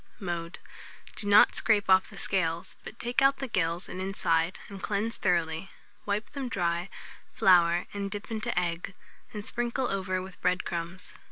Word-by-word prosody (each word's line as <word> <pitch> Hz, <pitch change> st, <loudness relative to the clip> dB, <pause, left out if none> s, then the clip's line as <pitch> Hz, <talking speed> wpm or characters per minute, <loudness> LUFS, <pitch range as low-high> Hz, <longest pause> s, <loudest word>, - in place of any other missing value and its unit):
Mode. 170 Hz, -3 st, -4 dB, 0.6 s
Do 205 Hz, -, -5 dB
not 205 Hz, +1 st, +7 dB
scrape 210 Hz, -3 st, +3 dB
off 190 Hz, 0 st, +5 dB
the 200 Hz, -, -11 dB
scales, 170 Hz, -4 st, 0 dB
but -, -, -9 dB
take 240 Hz, +2 st, 0 dB
out 275 Hz, 0 st, +5 dB
the 270 Hz, -, -4 dB
gills 170 Hz, -4 st, -1 dB
and 185 Hz, -, -6 dB
inside, 170 Hz, -3 st, 0 dB
and 195 Hz, -1 st, -9 dB
cleanse 215 Hz, +2 st, -1 dB
thoroughly; 170 Hz, +1 st, 0 dB, 0.4 s
wipe 205 Hz, +2 st, -1 dB
them 275 Hz, -3 st, -4 dB
dry, 175 Hz, -2 st, -1 dB, 0.4 s
flour 175 Hz, -2 st, +4 dB
and 200 Hz, -1 st, -3 dB
dip 205 Hz, +1 st, -5 dB
them 225 Hz, -, -4 dB
into 215 Hz, -4 st, 0 dB
egg, 175 Hz, +2 st, -3 dB, 0.4 s
and 210 Hz, -1 st, -6 dB
sprinkle 240 Hz, +2 st, -1 dB
over 185 Hz, -1 st, -1 dB
with 185 Hz, 0 st, -9 dB
bread 180 Hz, +1 st, +1 dB
crumbs. 175 Hz, +1 st, -5 dB
190 Hz, 170 wpm, -29 LUFS, 175-210 Hz, 0.6 s, not